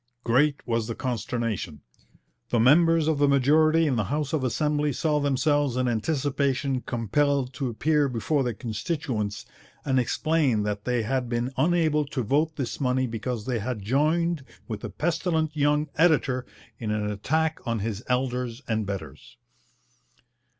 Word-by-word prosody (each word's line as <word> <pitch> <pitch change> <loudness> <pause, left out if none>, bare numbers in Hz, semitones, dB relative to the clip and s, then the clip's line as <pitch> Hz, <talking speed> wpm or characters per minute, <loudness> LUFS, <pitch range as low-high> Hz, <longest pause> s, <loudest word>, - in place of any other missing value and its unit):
Great 140 +5 +2
was 115 -2 -1
the 115 - -4
consternation. 115 - -3 0.7
The 120 - +1
members 160 +6 +5
of 155 -3 +1
the 145 - +4
majority 155 +4 +4
in 135 -5 +1
the 105 - 0
House 145 +5 -2
of 155 -4 0
Assembly 150 +3 0
saw 150 +2 +1
themselves 145 -1 +1
in 130 0 +1
anticipation 135 +1 0
compelled 130 +3 0
to 135 -1 -2
appear 145 +5 +1
before 130 +5 0
their 120 -3 -2
constituents 110 -1 -3 0.4
and 135 -2 +2
explain 130 -2 +1
that 105 -1 -3
they 125 -2 0
had 125 +2 -1
been 120 +2 -2
unable 160 -2 +2
to 135 -3 -3
vote 150 +7 +1
this 130 -5 -4
money 130 0 +1
because 115 -1 -4
they 125 -3 -1
had 110 -1 -4
joined 155 - +1 0.2
with 110 -3 -5
a - - -4
pestilent 160 -1 -1
young 150 +1 +2
editor 140 -6 +3 0.3
in 110 - -4
an 105 -1 -1
attack 160 +10 0
on 115 -1 0
his 105 +1 -3
elders 125 0 -1
and 110 -3 -1
betters. 85 -9 -7
130 Hz, 150 wpm, -26 LUFS, 115-150 Hz, 0.7 s, members